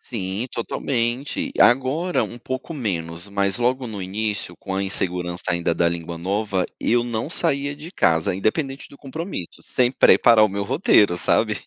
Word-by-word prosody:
Sim, 100 0 -4
totalmente. 125 - -2
Agora, 135 +8 +3
um 120 - -9
pouco 130 +6 -5
menos, 85 - -4
mas 100 0 +2
logo 125 +1 0
no 105 -3 -6
início, 100 -1 -3
com 95 -1 -6
a 95 - 0
insegurança 90 -2 -2
ainda 85 -1 0
da 85 - +2
língua 85 0 -5
nova, 95 +2 -1 0.2
eu 120 +1 +2
não 115 +2 -3
saía 140 -3 +1
de 155 +3 -9
casa, 80 - +2
independente 135 - -2
do - - -15
compromisso, 140 - -6
sem 125 -1 +1
preparar 115 -4 +6
o 110 - +2
meu 100 +1 -3
roteiro, 105 - +3
sabe. - - +1
110 Hz, 160 wpm, -22 LUFS, 95-130 Hz, 0.2 s, preparar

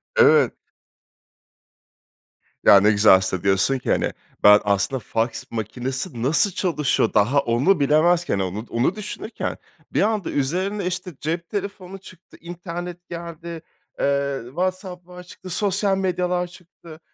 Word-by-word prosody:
Evet. 465 -1 +5 2.1
Ya 100 - +9
ne 105 +2 +4
güzel 105 0 +6
aslında 95 -1 -1
diyorsun 100 +7 +2
ki - - -2
hani, - - +1 0.3
ben 105 0 +8
aslında 100 +5 0
faks 115 +1 -2
makinesi 120 - -4
nasıl 160 +9 +3
çalışıyor, 150 - 0
daha 115 +7 +3
onu 140 +9 +2
bilemezken 155 - +2
onu 95 +4 -3
onu 125 +10 0
düşünürken. 210 +2 -5 0.4
Bir - - +2
anda 210 -4 0
üzerine 185 +8 -1
işte 180 0 -4
cep 165 +2 -3
telefonu 195 -2 -5
çıktı, 185 -2 -16
internet 175 +1 -7
geldi, 170 -1 -7 0.4
eee, 140 -1 0
WhatsApp 180 +5 -4
falan 180 0 -11
çıktı, 185 +1 -12
sosyal 195 +1 0
medyalar 180 -1 -1
çıktı. 170 -2 -15
170 Hz, 125 wpm, -22 LUFS, 125-185 Hz, 2.1 s, Ya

